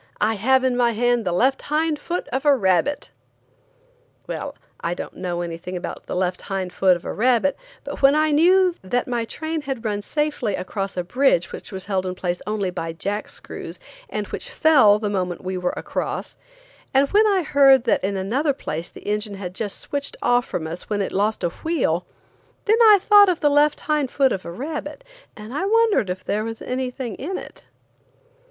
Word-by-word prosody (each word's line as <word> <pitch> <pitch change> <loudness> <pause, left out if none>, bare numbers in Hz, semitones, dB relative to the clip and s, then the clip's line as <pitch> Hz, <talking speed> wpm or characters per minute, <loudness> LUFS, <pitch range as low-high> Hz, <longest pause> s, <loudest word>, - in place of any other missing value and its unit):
I 215 +2 +2
have 260 +5 +2
in 255 -1 +2
my 240 -1 +2
hand 240 0 +1
the 180 - 0
left 260 +10 +2
hind 305 0 0
foot 350 +1 -4
of 265 +2 -2
a 290 -2 +5
rabbit!" 190 +6 +1 1.1
Well, - - -5 0.2
I 170 +1 -2
don't - - -7
know 175 -1 -3
anything 175 +2 -5
about 175 - -7
the - - -4
left 180 0 -1
hind 190 -2 -4
foot 185 -2 +4
of 170 - -17
a - - -3
rabbit, 250 +4 +2 0.3
but - - -7
when 275 +1 +6
I 310 0 +3
knew 360 +4 +5
that 245 +6 -1
my 240 -2 -1
train 315 +6 -4
had 265 -5 -5
run 205 -1 -1
safely 290 -4 -1
across 195 0 -4
a 180 - 0
bridge 185 -3 +2
which - - -9
was 190 -1 -5
held 190 -2 -1
in 180 - -3
place 180 -1 -3
only 205 -3 -1
by 165 -2 -4
jack 205 +5 -4
screws, - - -9 0.3
and - - -3
which - - -5
fell 265 -10 +5
the 210 0 -3
moment 185 -4 -2
we 185 0 -3
were 180 -1 -1
across; - - -4 0.6
and 275 +1 +5
when 430 +1 +5
I 390 -3 +2
heard 275 -4 +5
that 235 - +1
in 195 +1 -1
another 260 +10 0
place 165 - -5
the - - -13
engine 210 0 -2
had 185 -2 -6
just 205 +1 -3
switched 285 0 -4
off 245 0 +2
from 160 - -3
us 165 +2 -7
when 205 -1 0
it - - -4
lost 205 +1 0
a 175 - +2
wheel, 180 - -1 0.6
then 440 +3 +3
I 425 -2 +9
thought 410 0 +6
of 355 -2 0
the 295 -3 +3
left 295 +1 +3
hind 300 -4 0
foot 270 0 +2
of 185 - -3
a - - -5
rabbit, 295 - -6 0.3
and 215 +3 -9
wondered 405 - +2
if 185 +1 -4
there 210 +1 -1
was 225 0 -5
anything 255 -2 -3
in 370 +7 -4
it. - - -11
235 Hz, 200 wpm, -22 LUFS, 190-290 Hz, 1.1 s, I